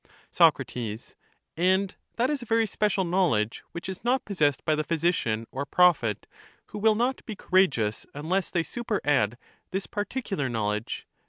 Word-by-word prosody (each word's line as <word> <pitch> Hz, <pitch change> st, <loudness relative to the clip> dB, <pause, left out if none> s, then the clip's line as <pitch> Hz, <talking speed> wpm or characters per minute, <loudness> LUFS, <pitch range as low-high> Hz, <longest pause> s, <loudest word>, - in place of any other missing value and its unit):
Soc, -, -, +5 dB, 1.0 s
And 190 Hz, +3 st, +2 dB, 0.2 s
that 245 Hz, +4 st, +1 dB
is 290 Hz, -3 st, -2 dB
a -, -, -7 dB
very 225 Hz, 0 st, +2 dB
special 205 Hz, -1 st, 0 dB
knowledge 170 Hz, -, +1 dB
which 170 Hz, -, -6 dB
is 190 Hz, -1 st, -6 dB
not 250 Hz, +2 st, +1 dB
possessed 150 Hz, -9 st, +1 dB
by 155 Hz, -, +3 dB
the 155 Hz, 0 st, 0 dB
phj^sician 155 Hz, -10 st, 0 dB
or 135 Hz, -, -3 dB
prophet, 140 Hz, -, +3 dB, 0.4 s
who -, -, -6 dB
will 215 Hz, +1 st, +4 dB
not 245 Hz, +4 st, 0 dB
be 215 Hz, -, -4 dB
courageous 135 Hz, -, +1 dB
unless 175 Hz, +6 st, -1 dB
they 170 Hz, -, 0 dB
superadd 145 Hz, -, 0 dB, 0.3 s
this 190 Hz, +1 st, -3 dB
particular 205 Hz, -, -3 dB
knowledge. 105 Hz, -2 st, -2 dB
180 Hz, 150 wpm, -27 LUFS, 140-210 Hz, 1.0 s, Soc